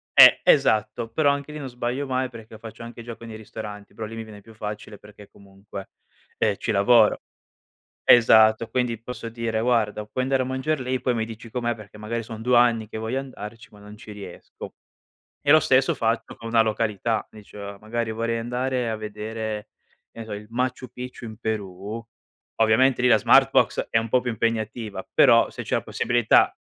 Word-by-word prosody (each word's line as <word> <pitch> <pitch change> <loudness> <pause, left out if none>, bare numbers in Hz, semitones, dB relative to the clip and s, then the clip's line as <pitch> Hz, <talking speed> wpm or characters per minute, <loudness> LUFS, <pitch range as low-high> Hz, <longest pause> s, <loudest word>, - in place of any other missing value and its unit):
eh - - +9
esatto, 110 +1 +3
però 145 +3 +2
anche 140 +1 -3
lì 150 - -6
non 135 -3 -6
sbaglio 125 +3 -3
mai 130 0 -1
perché 115 -2 -12
faccio 115 +1 -10
anche 115 0 -9
gioco 115 0 -9
nei 110 -1 -8
ristoranti, 105 -1 -9
però 110 - -5
lì 115 - -9
mi 115 0 -6
viene 105 -2 -12
più 115 - -15
facile 105 -1 -7
perché 105 -1 -15
comunque, 100 0 -11 0.5
ehm, - - +1
ci - - -3
lavoro 110 +2 +4 0.8
esatto, 110 -1 +6
quindi 125 -3 -1
posso 120 -1 -7
dire: 115 -1 -2
"Guarda 110 -3 +1
puoi 130 +4 -3
andare 135 0 +1
a - - -5
mangiar 130 +3 -1
lì 130 +1 -1
e - - -1
poi 125 0 0
mi 110 - 0
dici 115 +1 -10
com'è 120 0 -2
perché 105 -1 -13
magari 115 +2 -4
son 110 -1 -8
2 125 +1 +3
anni 115 -3 +3
che - - -6
voglio 110 +4 -2
andarci, 115 -4 -9
ma 105 - -16
non 105 +1 -12
ci 105 0 -12
riesco." 105 -1 -10 0.7
E 145 - +6
lo 155 - +8
stesso 130 0 +3
faccio 115 +1 -1
con 115 0 -8
una 115 -1 +4
località, 110 0 -1
dice 100 -1 -10
"magari 110 +1 -3
vorrei 115 +1 -1
andare 125 +1 -2
a 110 - -2
vedere 110 0 -5 0.4
che - - -13
ne 115 - -6
so 110 - -6
il 105 +1 -7
Machu 125 +1 -2
Picchu 125 0 -8
in 110 -1 -8
Perù," 105 0 -4 0.5
ovviamente 120 +3 +4
lì 125 - +4
la 110 - +6
Smartbox - - +4
è - - +2
un 115 0 -1
po' 125 - +4
più 125 0 -4
impegnativa, 110 -1 -3
però - - +6
se - - -7
c'è - - -1
la - - -1
possibilità 120 -2 +2
115 Hz, 195 wpm, -24 LUFS, 110-125 Hz, 0.8 s, eh